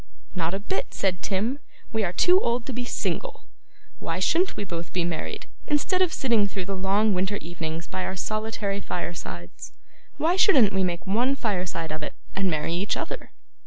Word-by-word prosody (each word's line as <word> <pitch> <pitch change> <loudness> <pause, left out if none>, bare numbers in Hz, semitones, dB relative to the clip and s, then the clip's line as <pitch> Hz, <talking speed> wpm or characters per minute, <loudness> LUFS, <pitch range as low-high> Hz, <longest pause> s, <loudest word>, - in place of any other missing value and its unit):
'Not 175 0 0
a - - -2
bit,' 200 -1 -3
said 185 -2 0
Tim; 220 +8 0 0.3
'we 220 -1 +2
are 175 - 0
too 360 - +5
old 235 0 0
to 265 - -4
be 245 +1 -2
single. - - -2 0.5
Why - - -2
shouldn't 365 +3 +2
we - - -1
both 170 -3 -5
be 180 - +1
married, 170 -2 -3 0.2
instead 310 +6 +2
of 365 -3 +4
sitting 235 -9 +3
through 195 -2 -4
the 195 +1 -2
long 200 +3 +3
winter 190 +2 +1
evenings 165 -1 -4
by 185 0 -3
our 190 - -3
solitary 215 0 -2
firesides? 165 - -5 0.4
Why 340 +4 +3
shouldn't 265 - +6
we 190 0 +2
make 175 -1 -1
one 240 +8 +2
fireside 180 - -1
of 155 0 -4
it, 150 - -5 0.2
and 195 -1 +2
marry 155 0 0
each 190 +4 0
other? 370 +9 -4
195 Hz, 185 wpm, -26 LUFS, 175-235 Hz, 0.5 s, shouldn't